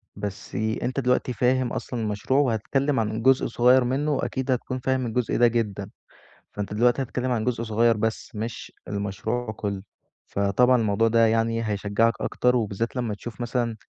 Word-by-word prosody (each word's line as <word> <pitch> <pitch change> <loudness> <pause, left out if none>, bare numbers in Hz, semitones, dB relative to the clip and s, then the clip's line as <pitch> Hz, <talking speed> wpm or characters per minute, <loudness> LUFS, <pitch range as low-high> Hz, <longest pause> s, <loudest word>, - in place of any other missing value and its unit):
بس 100 -1 -6
أنت 110 +5 -1
دلوقتي 125 0 +1
فاهم 125 +1 +1
أصلًا 125 - -4
المشروع 105 +5 0
وهتتكلم 135 +2 +1
عن 110 0 -1
جزء 130 +1 +4
صغير 125 +2 +4
منه 135 +5 0
وأكيد 130 -1 -2
هتكون 130 +1 -2
فاهم 130 0 0
الجزء 120 0 -1
ده 120 - +6
جدًا، 105 -4 -2 0.6
فأنت 105 0 -5
دلوقتي 120 +5 +3
هتتكلم 130 0 -2
عن 115 -3 0
جزء 120 -2 -1
صغير 115 0 +2
بس 110 +2 -2
مش 110 +2 -5 0.2
المشروع 105 +4 -3
كلّه. 100 -2 -4 0.4
فطبعًا 100 +6 +3
الموضوع 110 +1 +2
ده 115 0 +4
يعني 115 +1 +1
هيشجعك 105 +2 +1
أكتر 125 0 +1
وبالذات 115 0 -1
لمّا 120 -4 -1
تشوف 110 +2 -8
مثلًا، 120 -1 -1
115 Hz, 160 wpm, -25 LUFS, 110-125 Hz, 0.6 s, ده